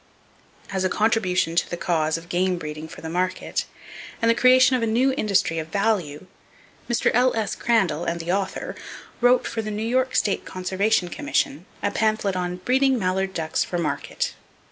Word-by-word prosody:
As 190 -1 -1
a 185 - +2
contribution 185 -6 +1
to - - +1
the 175 - -4
cause 160 -2 0
of 165 +1 -11
game 180 +1 0
breeding 155 -1 -6
for - - -11
the 160 - -6
market, 180 +2 -1 0.5
and 230 0 +3
the - - +4
creation 255 +2 +5
of 250 - 0
a 230 - +1
new 250 +4 +2
industry 200 -8 +1
of 160 - -5
value, 185 -5 -1 0.6
Mr. 240 - +2
L.S. 230 -3 +2
Crandall 190 -9 +1
and 170 0 -2
the 170 +1 -2
author 195 0 -2 0.5
wrote 245 +1 +4
for 225 - -2
the 215 - -5
New 215 +1 -3
York 260 +2 +1
State 200 - +1
Conservation 190 +1 0
Commission 180 - -1 0.2
a 200 - +1
pamphlet 215 -2 0
on 180 -1 -2
"Breeding 260 +7 +2
Mallard 190 -1 -1
Ducks 160 -2 0
for 175 - -4
Market." 170 -3 -2
195 Hz, 175 wpm, -24 LUFS, 175-230 Hz, 0.6 s, creation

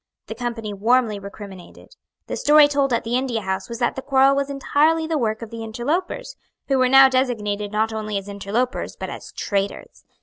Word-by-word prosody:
The - - -6
Company 230 -4 -4
warmly 220 +1 +1
recriminated. 200 - -11 0.3
The - - -4
story 295 0 +6
told 280 -2 0
at 235 - +1
the 230 +1 -2
India 250 -3 -1
House 190 +1 -3
was 235 - -5
that 240 0 0
the 265 - -4
quarrel 270 0 +4
was 280 0 -1
entirely 300 +4 +1
the 320 0 -2
work 220 -1 -1
of 225 - -9
the 230 -1 -6
interlopers, 300 - -3 0.3
who 270 -1 +2
were 255 0 +3
now 270 +1 +8
designated 210 -6 -1
not 220 +1 0
only 215 -1 -3
as 195 0 -6
interlopers 205 +5 -3
but - - -6
as - - -9
traitors. 200 -1 -4
235 Hz, 195 wpm, -22 LUFS, 210-270 Hz, 0.3 s, now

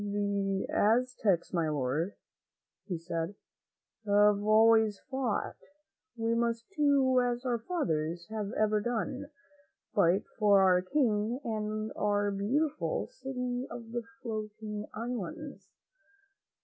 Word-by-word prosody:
"The 200 -1 -1
Aztecs, 220 -6 +2
my 165 -3 +1
Lord," 150 +6 -1 0.7
he 180 -4 -2
said, 165 +2 -4 0.4
" 225 - -49
have 205 0 +5
always 220 -1 +5
fought. 260 -5 -1 0.6
We 225 0 0
must 230 0 0
do 275 -4 +4
as 245 +1 -1
our 240 -2 0
fathers 170 - -2
have 210 -2 -3
ever 215 -1 +2
done, 245 +5 -3 0.6
fight 195 -2 +3 0.2
for 205 -2 +6
our 180 -1 +5
King 225 0 +1
and 215 -1 -3
our 205 0 +1
beautiful 275 +10 0
'City 250 - -4
of 230 -2 -8
the 240 0 -2 0.2
Floating 215 -2 -5
Islands.'" 250 - -5
215 Hz, 110 wpm, -31 LUFS, 200-245 Hz, 0.7 s, for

